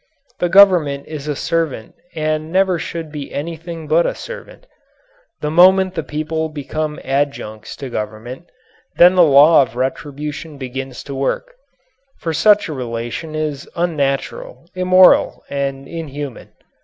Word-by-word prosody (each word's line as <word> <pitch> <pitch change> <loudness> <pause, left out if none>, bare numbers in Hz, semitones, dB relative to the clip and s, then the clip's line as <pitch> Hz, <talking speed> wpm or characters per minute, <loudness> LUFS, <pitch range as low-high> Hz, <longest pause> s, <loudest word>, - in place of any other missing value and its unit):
The 175 - +1
Government 175 -8 +5
is 150 -2 -7
a 150 - -1
servant 160 -7 -2 0.2
and 155 0 -2
never 185 -1 +2
should 165 -2 -6
be 145 -2 -7
anything 165 +1 -6
but 165 +3 +3
a - - -2
servant. - - -10 0.8
The 150 - -2
moment 185 +2 +5
the 165 - -2
people 155 +1 -3
become 150 +1 -4
adjuncts 135 -6 -3
to 135 - -7
government, 115 +9 -6 0.5
then 175 +1 +7
the 185 - +5
law 150 0 +7
of 125 -3 -2
retribution 145 +4 -4
begins 130 0 -6
to 140 - -7
work, 140 - -2 0.6
for 165 - -3
such 210 +5 +4
a 155 - -5
relation 120 +4 -5
is 150 -3 -3
unnatural, 170 - -2
immoral, 185 0 +4
and 140 -1 -3
inhuman. 145 -5 -7
155 Hz, 135 wpm, -18 LUFS, 140-170 Hz, 0.8 s, then